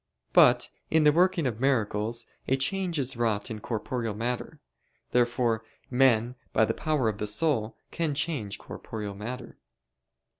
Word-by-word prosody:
But - - +6 0.2
in 160 0 +4
the 150 - +7
working 175 0 +3
of 115 -4 -1
miracles 115 -3 0 0.2
a 135 - +3
change 180 +4 0
is 135 -2 0
wrought 115 -3 0
in 110 - -5
corporeal 115 0 -3
matter. 120 +3 -3 0.5
Therefore 120 -2 +2 0.3
men, 125 -2 +4 0.2
by 110 - +4
the - - -1
power 150 -7 0
of 105 -2 -2
the 105 - -1
soul, 110 -1 0
can 160 -4 -1
change 140 -9 -2
corporeal 105 -2 -7
matter. 120 +5 -7
120 Hz, 145 wpm, -28 LUFS, 110-145 Hz, 0.5 s, the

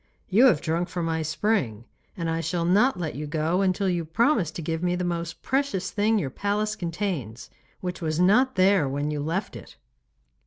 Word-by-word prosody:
'You 215 +7 +5
have 165 - +3
drunk 170 +3 -1
from 175 -2 -3
my 160 0 -1
spring, 155 - -1 0.3
and 170 -2 -2
I 165 0 -1
shall 170 0 -1
not 205 +6 +3
let 160 -3 -3
you 150 +2 -5
go 160 +4 0
until 195 +1 +1
you 175 -2 0
promise 205 - +2
to 165 - -7
give 160 +1 -2
me 180 0 +1
the 180 - -2
most 170 -2 -4
precious 265 -9 -1
thing 215 +1 +2
your 140 -10 -2
palace 210 +5 -1
contains, 165 - -4 0.3
which 180 -1 -4
was 155 -1 -1
not 235 +9 +4
there 185 -6 +4
when 145 +2 -2
you 150 - -3
left 165 +7 -3
it. - - -11
175 Hz, 195 wpm, -25 LUFS, 160-200 Hz, 0.3 s, You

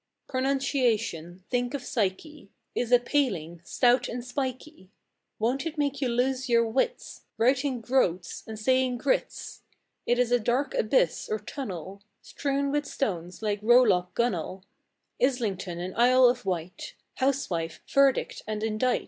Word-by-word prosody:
Pronunciation—think 245 - -1
of 270 - -5
psyche!— 235 +3 -3 0.2
Is 245 -1 -2
a 245 - +8
paling, 200 - -1
stout 245 +6 +2
and 240 0 -5
spikey; 260 - -5 0.5
Won't 255 +7 0
it 320 -1 -6
make 285 -1 -1
you 260 - +1
lose 255 +2 0
your 235 -1 +4
wits, 270 - -2 0.2
Writing 255 +2 +1
"groats" 185 -8 0
and 220 -1 -6
saying 255 +2 +1
groats? 265 +2 -2 0.5
It's 245 0 +2
a 245 - +4
dark 250 - 0
abyss - - +1
or 435 - 0
tunnel, 200 - -7 0.2
Strewn 280 0 -2
with 295 0 -1
stones, 180 -5 -3
like 205 -1 -1
rowlock, 215 -6 +4
gunwale, 190 -5 -1 0.6
Islington 200 -9 0
and 180 +1 -5
Isle 255 +2 +5
of 245 -4 0
Wight, 180 -1 -4 0.2
Housewife, 175 - -1
verdict 275 -1 +2
and 215 0 -3
indict! 225 +3 +1
245 Hz, 130 wpm, -27 LUFS, 200-270 Hz, 0.6 s, a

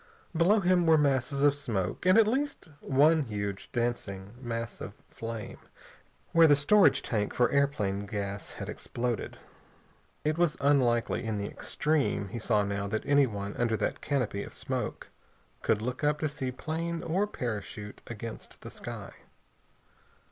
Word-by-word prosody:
Below 190 +6 +4
him 180 -2 +3
were 160 -1 +7
masses 140 -1 +1
of 145 -1 +6
smoke 120 - -2
and 185 +3 +6
at 225 - +7
least 260 - -1
one 150 +4 +4
huge 100 -5 -4
dancing 105 -5 -2
mass 115 -2 -4
of - - -6 0.2
flame, 115 -1 -6 0.7
where 165 -1 +7
the 145 - +7
storage 145 +2 +5
tank 105 -3 -1
for 125 - +3
airplane 105 -9 +1
gas 100 -2 -4
had - - -6
exploded. 120 -1 -3 0.9
It 155 +2 0
was 175 -3 +2
unlikely 130 -6 +2
in 110 -2 -2
the 100 - -2
extreme, 140 -7 -1
he 120 - -5
saw 105 -2 +2
now, 100 0 -2
that 110 +2 -2
anyone 110 -8 +2
under 115 -2 +1
that - - -2
canopy 125 -8 -1
of - - -8
smoke - - -4 0.5
could 110 0 +1
look 125 +4 -3
up 150 0 +3
to 155 - +2
see 140 -3 -4
plane 165 +5 -3
or 185 +6 +1
parachute 105 - -5
against 115 -1 -8
the - - -9
sky. - - -7
125 Hz, 150 wpm, -29 LUFS, 105-155 Hz, 0.9 s, were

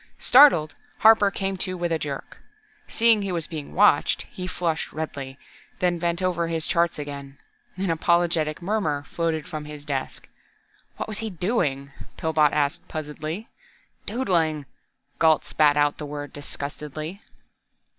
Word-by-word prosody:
Startled, 245 - +6 0.2
Harper 220 -2 +6
came 195 -1 -3
to 185 0 -3
with 175 -1 -2
a 165 - +1
jerk. 140 -3 -6 0.5
Seeing 225 -2 +4
he 200 -1 -3
was 170 -3 -1
being 155 -4 -7
watched, 205 +2 +4
he 180 -1 -7
flushed 170 -3 -2
redly, 140 -4 -5 0.4
then 175 -1 +1
bent 170 +2 -1
over 170 -2 0
his 165 -1 -1
charts 170 -1 +1
again. 140 -2 -7 0.4
An 190 -1 -1
apologetic 165 -1 +1
murmur 170 -8 -1
floated 160 0 -2
from 155 -1 -6
his 150 -1 -9
desk. 135 -3 -4 0.7
"What - - -4
was 215 -1 -4
he 225 0 -3
doing?" 160 - -1 0.3
Pillbot 155 -2 +2
asked 145 -1 -1
puzzledly. 155 +5 -5 0.6
"Doodling!" 170 - 0 0.5
Gault 160 -1 +4
spat 150 -1 +3
out 145 0 +2
the 150 - -5
word 145 -1 -6
disgustedly. 150 +5 -6
160 Hz, 140 wpm, -24 LUFS, 150-185 Hz, 0.7 s, Startled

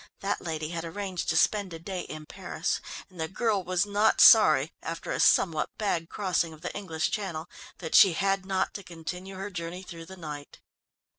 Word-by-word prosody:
That 200 +1 -1
lady 160 -2 -4
had 165 -1 -4
arranged 185 +1 -4
to 160 - +2
spend 200 0 +2
a - - -5
day 180 +2 -5
in 155 0 -8
Paris, - - -3 0.3
and 180 -3 -10
the 160 - -1
girl 205 +1 0
was 180 +1 +1
not 205 +1 +2
sorry, - - +7
after - - -5
a - - -2
somewhat 160 -4 +3
bad 175 -6 -1
crossing 180 -5 -1
of 155 - -15
the 180 - -5
English 165 -6 -2
Channel, 180 -7 -3 0.3
that 165 -3 -6
she 195 -4 +8
had 195 +2 0
not 190 0 -1
to 200 - -6
continue 180 +3 -7
her 195 +2 -6
journey 175 +1 -6
through 165 -2 -9
the 190 - -11
night. 150 -4 -8
180 Hz, 195 wpm, -28 LUFS, 165-195 Hz, 0.3 s, she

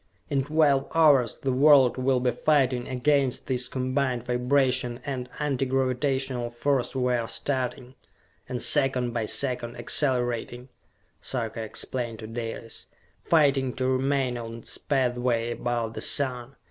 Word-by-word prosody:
"In 135 -2 +1
twelve 145 -2 +2
hours 145 -8 +4
the 135 - -2
world 135 -1 +5
will 130 0 +1
be 125 0 +1
fighting 130 -2 +1
against 135 0 0
this 125 -1 -1
combined 130 -1 -1
vibration 125 0 +1
and 130 -3 -4
Anti 140 -3 -1
Gravitational 130 -1 -1
Force 130 +2 -1
we 125 -1 +1
are 120 -2 -1
starting, 125 +1 -3 0.6
and 125 -2 -3
second 130 -4 +2
by 115 -2 -2
second 125 -3 -1
accelerating," 125 -2 -1 0.5
Sarka 115 -3 -3
explained 115 +1 -3
to 110 - -9
Dalis: 115 0 -7 0.4
"fighting 140 -5 +2
to 130 - -2
remain 130 -1 0
on 115 0 -7
its 115 - -3
pathway 125 -3 0
about 120 -1 -2
the - - -6
Sun! 130 -2 +1
125 Hz, 135 wpm, -26 LUFS, 120-135 Hz, 0.6 s, world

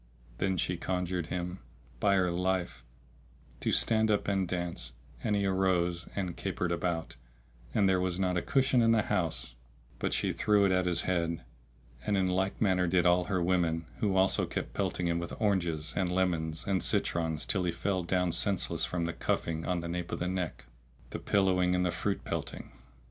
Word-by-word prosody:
Then 95 -1 +1
she 90 0 -1
conjured 90 -1 -2
him, 90 +1 -4 0.4
by 100 -1 +3
her 90 -2 +2
life, 90 -7 -1 0.8
to - - 0
stand 110 -1 +3
up 105 -1 +1
and 95 -2 +1
dance, 85 -8 -3 0.3
and 105 -3 +1
he 100 -1 +1
arose, 90 -2 +1
and 90 -4 -2
capered 85 -1 -2
about, 85 -4 -2 0.5
and 100 -2 +3
there 95 -1 +3
was 90 0 -1
not 90 -1 +1
a 90 - +1
cushion 130 +1 +3
in 115 0 +5
the 110 -2 +3
house 85 -11 -1 0.5
but - - -1
she - - 0
threw 105 -1 +3
it 95 - +3
at 90 0 +2
his 85 -1 +1
head, 85 -4 -1 0.6
and 105 - +1
in 95 - +2
like 95 +1 0
manner 95 -4 +2
did 90 0 +2
all 90 0 +4
her 95 -2 0
women 85 -2 +1
who 100 -3 +1
also 95 0 +3
kept - - -4
pelting 90 - -1
him 85 0 +1
with 85 0 -6
oranges 85 -7 0
and 95 -2 +1
lemons 85 -3 0
and 95 -2 +1
citrons 80 -2 +1
till 95 - 0
he 90 - +1
fell 95 +2 -1
down 90 0 0
senseless 100 +2 +3
from 85 -1 -2
the 85 - -2
cuffing 80 -1 -2
on 90 -2 0
the 85 - -5
nape 90 0 -4
of - - -2
the 90 - -2
neck, 90 -6 -3 0.5
the - - -4
pillowing 90 -3 +2
and 90 0 +1
the 90 - +1
fruit 95 +3 -2
pelting. - - -5
90 Hz, 190 wpm, -30 LUFS, 85-95 Hz, 0.8 s, in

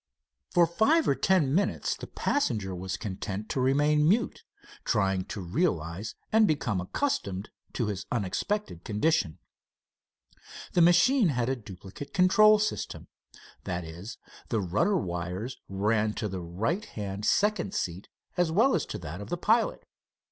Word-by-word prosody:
For 175 -2 +5
five 220 - +3
or - - +4
ten 180 -9 +2
minutes 200 +5 0
the - - -9
passenger 110 - -1
was 95 +1 -4
content 100 0 -5
to 130 - -1
remain 150 +3 +3
mute, 225 +5 +1 0.4
trying 95 -1 +1
to 100 - -6
realize 90 - -1 0.2
and 220 -1 +5
become 125 - 0
accustomed 100 - -2 0.2
to 120 - -1
his 100 -1 -4
unexpected 120 - -2
condition. 105 - +1 1.4
The 175 - +4
machine 180 +8 +5
had 125 -5 0
a 135 - +1
duplicate 105 - -10
control 215 +3 +6
system. 215 0 -3 0.6
That 90 -1 -3
is, 85 +8 -8 0.3
the 115 - +1
rudder 135 - +1
wires 90 - -4
ran 105 +2 +1
to 105 - -2
the 95 -2 -5
right 110 - -2
hand 100 -1 -6
second 205 - +1
seat 90 - -3 0.3
as 175 -2 +2
well 230 +10 +4
as - - 0
to - - -5
that 85 0 -7
of 100 - -8
the 175 - -2
pilot. 225 +6 +1
115 Hz, 145 wpm, -28 LUFS, -, 1.4 s, control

